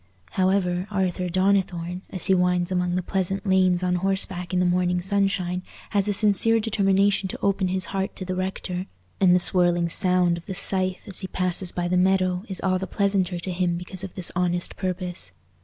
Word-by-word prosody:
However, 185 -1 +1
Arthur 185 -3 -1
Donnithorne, 185 -1 0
as 185 - -4
he 190 - +3
winds 180 0 +1
among 180 -1 0
the 180 - -1
pleasant 195 +2 -2
lanes 185 -2 +3
on 180 0 +1
horseback 190 -1 -1
in 180 - +1
the 180 - +2
morning 180 0 +1
sunshine, 190 -1 0 0.3
has 200 -1 +1
a - - +2
sincere 215 +2 +4
determination 200 -2 +1
to - - -6
open 195 -1 +1
his 185 0 -1
heart 195 0 -2
to 185 - -4
the 185 - -3
rector, 185 0 -3 0.3
and 180 -2 +5
the - - +4
swirling 175 -2 +2
sound 180 -1 +2
of 170 - -19
the 190 - -4
scythe 185 -1 0
as 195 - -3
he 190 - -4
passes 185 0 -1
by 175 -1 -2
the 180 +1 +1
meadow 185 0 +2
is 190 - -3
all 185 -1 +1
the 190 - -4
pleasanter 195 -3 0
to 175 +2 -4
him 175 -1 0
because 180 +1 -6
of 195 - -7
this 185 -2 -1
honest 175 -1 0
purpose. 185 -1 -4
185 Hz, 195 wpm, -24 LUFS, 180-195 Hz, 0.3 s, and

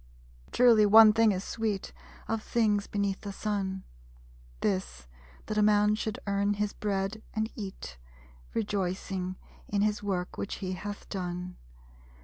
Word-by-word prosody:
_Truly, 230 -4 +6
one 215 +1 +9
thing 225 -1 +4
is 190 -1 -2
sweet 215 -3 -3 0.3
Of 225 -1 -1
things 210 -3 +1
beneath 200 -1 -1
the 200 - -5
Sun; 195 -2 -3 0.8
This, 65 - -2 0.4
that 215 0 -1
a - - +4
man 210 0 +4
should 215 0 -2
earn 200 0 +1
his 205 0 -1
bread 200 +1 -2
and 220 +1 -1
eat, 190 - -8 0.6
Rejoicing 190 -3 -2 0.3
in 200 0 +1
his 210 0 0
work 185 -3 -3
which 200 - -3
he 185 -2 -4
hath 205 +3 -6
done. 180 -1 -4
205 Hz, 135 wpm, -29 LUFS, 190-215 Hz, 0.8 s, one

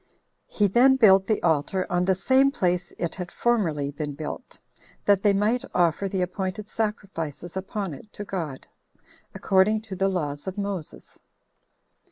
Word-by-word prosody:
He 210 - +1
then 245 +7 +5
built 195 -6 +5
the 215 - +1
altar 165 +3 +1
on 180 0 0
the 190 0 +3
same 260 +8 +4
place 180 -8 -1
it 170 -2 -2
had 180 -2 -6
formerly 165 -14 0
been 145 0 -5
built, 155 - -7 0.5
that 200 -2 +4
they 205 - +4
might 215 +6 +1
offer 175 +2 +2
the 190 -1 0
appointed 190 +3 -4
sacrifices 190 -7 -4
upon 190 -1 -4
it 210 +10 -12
to 205 - -6
God, 165 -9 -5 0.7
according 200 +3 +3
to 215 -3 -8
the 195 +1 +1
laws 150 -4 -3
of 190 - -4
Moses. 200 -5 -6
190 Hz, 155 wpm, -25 LUFS, 175-210 Hz, 0.7 s, then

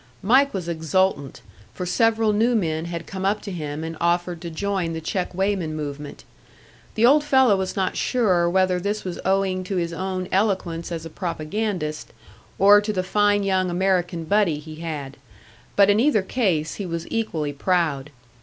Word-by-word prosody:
Mike 265 +7 +4
was 185 -4 -4
exultant, 160 -3 0 0.3
for 180 - -4
several 225 +2 +2
new 230 +4 +2
men 160 -6 -1
had 170 -1 -5
come 190 -1 -6
up 200 +2 +1
to 205 - -7
him 155 -3 -5
and 165 0 -5
offered 175 0 0
to 170 - -5
join 185 0 -2
the 160 - -3
check 180 +3 -3
weighman 190 -5 -1
movement. 145 -1 -6 0.7
The 225 - +4
old 290 +4 +5
fellow 265 -7 +4
was 190 -1 -3
not 190 -2 -1
sure 185 -9 +2
whether 185 0 +2
this 205 +3 -2
was 180 -2 -5
owing 190 -1 +1
to 195 - -3
his 170 -2 -1
own 185 +1 -3
eloquence 185 -4 0
as 165 -1 -5
a 165 - -8
propagandist, 175 -2 -3 0.4
or 205 +1 +7
to 210 +1 -2
the 185 -3 -1
fine 205 +1 +2
young 190 -2 +1
American 175 -2 0
buddy 190 -3 +2
he 155 +1 -10
had; 150 -4 -6 0.6
but 200 -1 +6
in 205 +1 +4
either 235 -6 +3
case 185 -8 0
he - - -3
was 170 -1 -4
equally 160 -10 -2
proud. 150 -3 0
185 Hz, 175 wpm, -23 LUFS, 165-205 Hz, 0.7 s, or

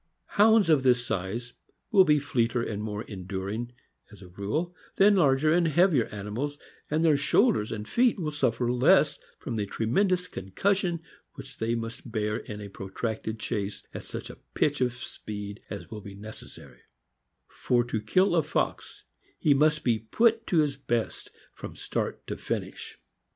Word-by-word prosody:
Hounds 215 -1 +5
of 155 -4 +5
this 125 -1 +3
size 115 +5 -3 0.4
will 195 -3 +7
be 150 -2 +5
fleeter 120 -4 0
and 105 -2 -3
more 105 0 -4
enduring, 100 +4 -5 0.4
as 100 -2 -13
a 90 - -12
rule, 130 - -3 0.2
than 205 +1 +6
larger 155 -3 +4
and 170 -1 +3
heavier 160 - +4
animals, 105 +8 -4 0.3
and 155 +2 +1
their 155 -2 +5
shoul 200 - +4
ders 105 - -2
and 105 -1 -5
feet 240 -1 +3
will 160 -5 -2
suffer 125 -4 0
less 145 +4 +4 0.2
from 120 -4 -5
the 105 -1 -1
tremendous 180 - +1
concus 185 - 0
sion 175 -4 -2 0.3
which - - -10
they 115 +1 0
must 115 +1 -6
bear 105 0 -1
in 105 -2 -7
a 100 - -6
protracted 110 +3 -4
chase 100 -1 -3
at - - -5
such - - -7
a - - -15 0.2
pitch 145 -2 +1
of 125 -1 +2
speed 105 -4 -7
as 100 - -7
will 110 -1 -6
be 100 0 -10
necessary; 105 +2 -11 0.7
for 120 -1 +1
to 115 -2 -3
kill 185 - +3
a 165 - +5
fox 150 - -3 0.3
he 150 - +4
must 150 +2 +3
be 115 -3 +2
put 225 - +2
to 165 -4 +4
his 145 -2 -1
best 120 -4 -2 0.2
from - - -9
start - - -3
to - - -4
finish. - - -5
125 Hz, 170 wpm, -28 LUFS, 105-160 Hz, 0.7 s, will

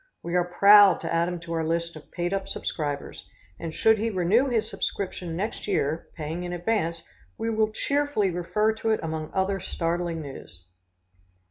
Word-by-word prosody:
We 170 - -4
are 175 0 +1
proud 200 -2 +8
to - - -3
add 165 +1 +2
him 175 -1 -3
to 170 -1 -6
our 165 -1 0
list 170 +1 -1
of 155 - -12
paid 175 +1 -2
up 195 0 -2
subscribers, 145 -6 -4 0.3
and 165 - -4
should 220 +6 +3
he 225 +2 0
renew 205 +7 +2
his 235 -4 +1
subscription 180 -3 -3
next 205 +5 -3
year, 160 -5 0
paying 160 +3 -4
in 175 0 -4
advance, 175 -2 -1 0.3
we 225 0 -1
will 215 -1 +1
cheerfully 280 -5 0
refer 210 +5 +1
to 225 0 -3
it 220 - +2
among 160 -1 -3
other 195 +1 0
startling 170 -2 -2
news." 90 -11 -10
175 Hz, 175 wpm, -26 LUFS, 165-210 Hz, 0.3 s, proud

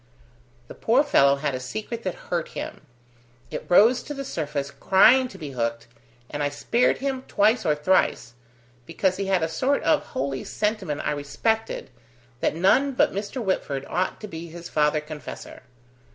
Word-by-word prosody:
"The - - -9
poor - - +3
fellow 140 0 +4
had 140 0 -2
a 130 - -3
secret 215 - -5
that 185 -5 -3 0.2
hurt 170 -2 0
him. - - -6 0.7
It - - -6
rose 225 +8 +6
to 295 - -7
the 275 0 -5
surface 145 - -3
crying 245 - +5
to 195 - -12
be 150 -6 -7
hooked, 115 -2 -2 0.5
and 145 - -3
I 145 - +1
spared 230 +12 +1
him 270 -1 -2
twice 220 +1 +2
or 150 - +3
thrice, 150 -7 +1 0.5
because 185 -1 0
he 195 0 -2
had 190 -3 +2
a - - +2
sort 255 - 0
of 310 - +3
holy 135 0 -3
sentiment 210 -8 -2
I - - +1
respected, 150 - -2 0.5
that - - 0
none 260 +11 +3
but - - +2
Mr. 205 +5 -4
Whitford 140 -8 -2
ought 185 +1 -1
to 215 - -6
be 165 -2 -7
his 170 +1 -9
father 150 0 +2
confessor." 150 0 -9
175 Hz, 170 wpm, -25 LUFS, 145-220 Hz, 0.7 s, rose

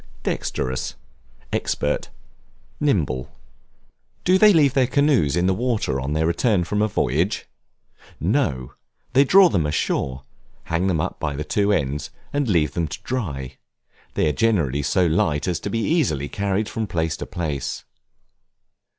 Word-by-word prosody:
Dexterous, 65 0 -2 0.6
expert, 75 - -1 0.7
nimble. 70 - 0 0.9
Do 185 +1 +4
they 215 +1 +8
leave 150 -7 +4
their 130 -3 +3
canoes 130 - +2
in 90 +1 +1
the 95 - +3
water 110 - -1
on 70 +3 -2
their 80 +1 +1
return 90 +3 +2
from 105 +4 -1
a 105 - +3
voyage? 85 - 0 0.7
No, 80 - 0 0.4
they 135 +1 +6
draw 190 +7 +7
them 85 - +1
ashore, 70 -3 -1 0.4
hang 85 +3 -1
them 90 -4 +1
up 90 +4 -3
by 75 -3 -2
the 75 - -3
two 100 +5 +1
ends, 70 -5 -1 0.2
and 145 -2 0
leave 80 -6 +2
them 85 -2 -1
to 95 - -7
dry; 75 - -4 0.6
they - - +2
are - - +3
generally 80 - +1
so 90 +6 +2
light 80 -2 +1
as 90 -2 0
to - - -4
be 115 +3 -1
easily 110 - +1
carried 100 +4 -1
from 110 -1 -3
place 80 -3 -1
to - - -6
place. 75 -5 -3
85 Hz, 150 wpm, -22 LUFS, 75-115 Hz, 0.9 s, they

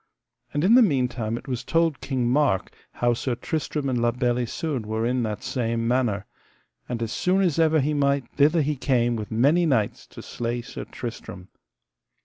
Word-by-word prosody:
And 145 - -1
in 200 +5 +5
the 255 - +8
meantime 125 - +1
it - - -11
was 125 -2 -3
told 165 0 +1
King 130 -3 -1
Mark 125 -7 +1 0.2
how 120 0 +1
Sir 120 +1 -2
Tristram 150 +2 -3
and 125 -3 0
La 120 - +3
Beale 120 +1 0
Isoud 130 +2 -2
were 110 +1 -1
in 125 +1 +1
that 105 -3 -3
same 115 -2 -1
manor, 120 -5 0 0.6
and 120 -1 -2
as 115 - -3
soon 185 +7 +1
as 170 -4 +1
ever 160 -1 +4
he 150 +3 0
might 140 -2 +1
thither 150 +3 +3
he 150 +1 -1
came 120 -3 +1
with 105 -2 -5
many 145 +10 +3
knights 115 -8 0
to - - -11
slay 120 0 -3
Sir 130 - -7
Tristram. 110 -6 -8
125 Hz, 185 wpm, -24 LUFS, 115-145 Hz, 0.6 s, the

